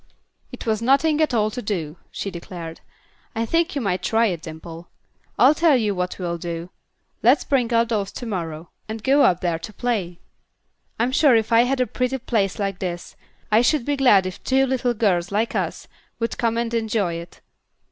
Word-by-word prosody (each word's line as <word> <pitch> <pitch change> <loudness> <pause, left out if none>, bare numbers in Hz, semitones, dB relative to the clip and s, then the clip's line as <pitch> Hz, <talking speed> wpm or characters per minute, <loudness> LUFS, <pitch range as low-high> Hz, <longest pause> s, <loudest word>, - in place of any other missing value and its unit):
"It - - -8
was 220 -1 0
nothing 290 +5 +3
at 310 - +2
all 215 -3 +1
to 245 - -5
do," 175 -7 -3
she 195 - -5
declared. 170 -2 -8 0.5
"I 225 +1 0
think 335 +7 0
you 280 - -1
might 190 -4 -1
try 225 +1 +2
it, 175 -7 -1
Dimple. 165 +1 -9 0.5
I'll 275 - +6
tell 310 -3 +4
you 215 -4 0
what 180 -1 -3
we'll 170 -2 -3
do: 170 +1 -5 0.5
let's 250 +6 +4
bring 250 -4 +1
our 230 0 +4
dolls 210 -4 -2
to 245 - -6
morrow, 165 -6 -5 0.2
and 220 0 -5
go 275 +3 +4
up 180 -8 +4
there 170 -2 0
and 210 - -8
play. 200 -8 -2 0.8
I'm 240 +3 +1
sure 275 -2 +5
if 225 0 +1
I 230 +1 +6
had 265 +1 0
a 255 - +3
pretty 250 +1 -1
place 220 -6 -1
like 195 -2 -2
this, 175 -2 -5 0.4
I 215 +2 +5
should 250 0 +2
be 290 - 0
glad 245 -9 +5
if 185 - -6
two 265 +1 +3
little 250 -2 0
girls, 195 -6 +1
like 215 +3 0
us, - - -3 0.3
could 230 0 -2
come 230 -1 0
and 235 0 -1
enjoy 220 -5 0
it. 170 +1 -9
220 Hz, 200 wpm, -22 LUFS, 180-250 Hz, 0.8 s, I'll